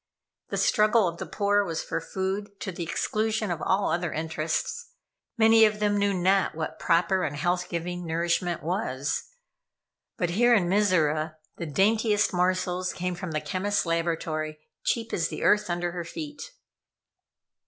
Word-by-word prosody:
The - - -2
struggle 215 -1 +4
of 170 0 -5
the - - -5
poor 205 0 +2
was 165 -4 -3
for - - -3
food, 195 +4 -4
to 190 - -3
the 175 - -7
exclusion 215 +4 -1
of 170 - -3
all 195 +1 +1
other 175 -1 -1
interests. 165 - -3 0.4
Many 225 0 +6
of 215 -1 +3
them 205 -1 +2
knew 200 0 +2
not 190 0 +2
what 155 -1 -4
proper 175 +3 +2
and 145 - -2
health 175 +4 -1
giving 175 0 -4
nourishment 170 +2 0
was. 150 -6 -2 0.9
But 175 -5 0
here 240 +6 +5
in 185 -5 +2
Mizora, 160 -6 +2 0.2
the 170 - -4
daintiest 210 +6 +2
morsels 180 0 0
came 180 0 -2
from 180 0 -6
the 155 -1 -2
chemists 200 +2 -1
laboratory, 165 -2 -1 0.3
cheap 230 -1 -1
as 165 -2 +1
the - - -5
earth 210 -3 +3
under 175 0 -1
her 175 0 -4
feet. 295 - -7
180 Hz, 155 wpm, -27 LUFS, 170-205 Hz, 0.9 s, Many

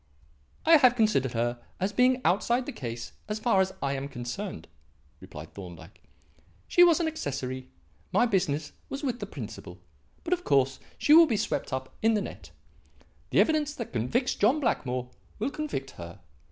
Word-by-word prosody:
"I 325 0 +8
have 255 -4 +5
considered 210 - +2
her 120 +1 -1 0.2
as 195 +3 -1
being 255 +1 +3
outside 235 +8 +2
the 285 - -4
case 120 - -6 0.2
as 210 0 -2
far 215 -3 +3
as 190 0 0
I 140 0 0
am 135 0 -3
concerned," 120 -3 -6 0.5
replied 75 +1 -10
Thorndyke. 90 -4 -11 0.7
"She 350 - +6
was 345 -1 +6
an 335 - +1
accessory; 130 - -4 0.4
my - - +4
business 155 -9 0 0.2
was 275 +2 -5
with 250 -3 -1
the 205 - -5
principal. 110 - -8 0.5
But, 340 - 0
of 355 0 -2
course, 135 -1 +2 0.2
she 295 - +4
will 330 +1 +9
be 230 -6 0
swept 210 - -2
up 130 0 -4
in 225 0 +3
the 210 - +1
net. - - -9 0.8
The - - +5
evidence 300 -2 +1
that 235 - -6
convicts 130 - 0
John 245 +9 +3
Blackmore 125 - -1 0.3
will 235 +6 -2
convict 285 - -4
her. 85 0 -10
195 Hz, 170 wpm, -28 LUFS, -, 0.8 s, will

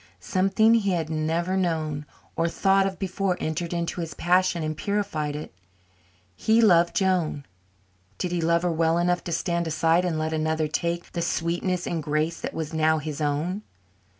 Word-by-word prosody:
Something 195 - +3
he 200 -4 +2
had 165 -2 -2
never 165 +4 0
known 155 -5 -1 0.3
or 165 - +1
thought 195 +2 +3
of 190 -1 -5
before 190 -1 -1
entered 160 +2 -3
into 170 0 -2
his 165 -1 -5
passion 180 -1 +2
and 155 0 -2
purified 160 -6 -2
it. 150 - -7 0.8
He 220 - +3
loved 175 -6 +5
Joan. 180 -8 +1 0.7
Did 180 - -2
he 175 -1 0
love 170 +1 +2
her 175 - +1
well 165 0 +2
enough 175 +1 +1
to 175 - -4
stand 170 +1 -1
aside 165 +2 +2
and 175 -3 -1
let 155 0 -1
another 155 0 0
take 170 +3 -2
the 170 - -3
sweetness 175 +2 -1
and 165 -2 -2
grace 155 +2 -1
that - - -5
was 160 -1 -4
now 160 0 +3
his 155 0 -5
own? 155 +7 -1
170 Hz, 175 wpm, -25 LUFS, 155-180 Hz, 0.8 s, loved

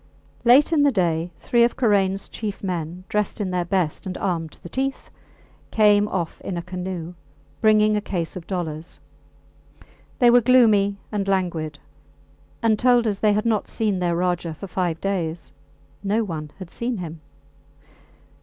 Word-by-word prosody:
Late 265 +7 +6
in 305 - +4
the 285 -1 +5
day 175 -5 0
three 240 -1 +3
of 240 - +1
Karains 195 -5 +2
chief 210 -3 -6
men, 175 -1 -4
dressed 210 0 -1
in 195 -3 -2
their 180 -1 0
best 180 0 -1
and 185 - -4
armed 165 -5 -2
to - - -19
the - - -7
teeth, 270 +7 -3 0.6
came 210 -1 +4
off 175 -5 -3
in 180 - -4
a 170 - -4
canoe, 180 -1 -5 0.5
bringing 215 -1 +4
a 210 - 0
case 175 -5 -3
of 175 -2 -8
dollars. 165 -4 -5 1.2
They 240 -3 +6
were 245 0 +6
gloomy 215 -5 +4
and 200 -2 -2
languid, 170 -6 -1 0.9
and 220 -2 +3
told 245 -1 +4
us 205 -3 -1
they 210 -1 +3
had 210 +2 0
not 220 -3 +1
seen 210 -4 -1
their 175 -1 0
Rajah 175 -2 -1
for 195 - -8
five 175 -3 -2
days. 175 -4 -3 0.5
No 210 +3 +1
one 160 -6 -5
had 185 -3 -9
seen 235 0 -3
him! 165 -3 -7
195 Hz, 165 wpm, -23 LUFS, 175-215 Hz, 1.2 s, Late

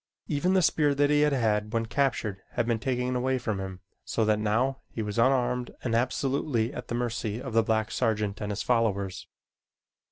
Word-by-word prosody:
Even 175 +6 +1
the 185 - +4
spear 150 -2 +3
that 145 +1 +3
he 150 0 +4
had 150 0 +4
had 105 -5 +1
when 115 0 +1
captured 110 -6 -1
had 120 - 0
been 115 -1 0
taken 125 +1 -1
away 130 +1 +1
from 110 -5 -2
him, 95 -1 -6 0.2
so 110 - 0
that 105 0 +2
now 120 +6 0
he 110 - -4
was 105 +1 -3
unarmed 125 0 +2
and 120 - -1
absolutely 125 0 0
at - - -7
the 120 - -3
mercy 115 -2 -2
of 130 -2 -6
the 115 - +5
black 110 0 0
sergeant 105 -2 0
and 105 0 -2
his 100 - -3
followers. 100 -5 0
115 Hz, 195 wpm, -28 LUFS, 105-130 Hz, 0.2 s, the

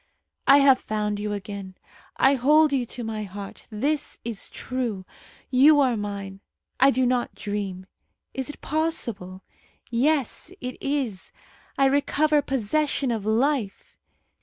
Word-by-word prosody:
"I 275 - +8
have 275 -2 +6
found 210 -1 -2
you 210 0 -3
again. 200 -1 -6 0.4
I 270 - +5
hold 295 +3 +4
you 250 -3 0
to 245 - -6
my 220 -1 -4
heart. 200 0 -8
This 280 +7 -2
is 230 -4 -5
true. 235 -7 -4 0.5
You 290 +4 +6
are 260 -4 +3
mine. 200 -2 -5 0.4
I 270 - +7
do 260 -1 +2
not 245 -1 0
dream. 200 -3 -4 0.5
Is 265 +1 -3
it 295 - -8
possible? 235 - -2 0.5
Yes, 270 +2 0
it 250 0 -7
is. 265 -9 -2 0.5
I 275 - +4
recover 290 +2 +2
possession 270 +1 0
of 215 -3 -3
life. 235 -1 0
245 Hz, 135 wpm, -25 LUFS, 205-275 Hz, 0.5 s, I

